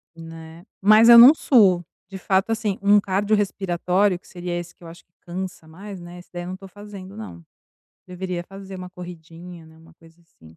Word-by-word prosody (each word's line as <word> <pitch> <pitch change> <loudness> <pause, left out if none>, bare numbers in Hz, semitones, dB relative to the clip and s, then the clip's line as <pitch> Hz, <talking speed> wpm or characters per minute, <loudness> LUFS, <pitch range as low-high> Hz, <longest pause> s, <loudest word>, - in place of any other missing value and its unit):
Né. 165 +1 -12 0.2
Mas 215 +3 +6
eu 235 - +10
não 245 +5 +10
suo. 195 - +3 0.2
De 195 - -8
fato, 190 +3 0
assim, 215 -3 -2
um 205 +1 +5
cardiorrespiratório, 195 -2 0
que - - -24
seria 175 -1 -6
esse 175 0 -8
que - - -21
eu - - -11
acho 165 +1 -14
que 175 - -54
cansa 180 -2 -7
mais, 195 +4 -10
né, 175 +1 -11
esse 175 - -15
daí 175 0 -6
eu - - -8
não 185 +1 -6
tô 195 - -13
fazendo, 200 -1 -12
não. 85 - -10 0.6
Deveria 180 -1 -5
fazer 195 +1 -11
uma 180 0 -8
corridinha, 175 -1 -12
né, 160 0 -19
uma 165 +1 -19
coisa 165 0 -22
assim, 80 - -20
180 Hz, 200 wpm, -22 LUFS, 170-200 Hz, 0.6 s, eu